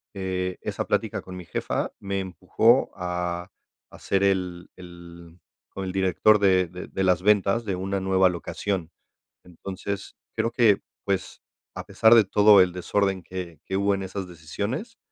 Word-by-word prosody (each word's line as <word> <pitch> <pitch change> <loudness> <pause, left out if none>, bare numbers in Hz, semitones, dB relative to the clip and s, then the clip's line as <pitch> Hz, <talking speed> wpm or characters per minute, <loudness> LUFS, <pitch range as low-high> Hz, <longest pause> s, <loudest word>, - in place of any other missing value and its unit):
eh, 95 -1 -3
esa - - -3
plática - - -1
con 95 - -9
mi 90 -1 -8
jefa - - -2
me 100 0 -3
empujó 95 - +2
a 90 -1 -3 0.4
a - - -13
ser 95 0 0
el 90 -3 -1
el 85 -1 -13 0.3
como 95 - -6
el 95 - -3
director 95 +3 +3
de 95 -2 +3
de 90 +2 -9
de 95 - -3
las 90 -2 +3
ventas 105 +2 +3
de 100 -3 -1
una 95 +2 -2
nueva 95 0 +3
locación. 90 0 -3 0.6
Entonces, 95 +3 -6 0.2
creo 115 +1 0
que, 110 -5 +3 0.2
pues, 95 -2 -2 0.3
a - - -6
pesar 110 +1 +5
de 115 -2 +7
todo 105 +1 +6
el 90 -1 0
desorden 95 +1 -1
que 85 -3 -7
que 95 - -2
hubo 100 0 +2
en 100 - -3
esas 95 0 -5
decisiones, 100 - -5
95 Hz, 165 wpm, -25 LUFS, 90-100 Hz, 0.6 s, de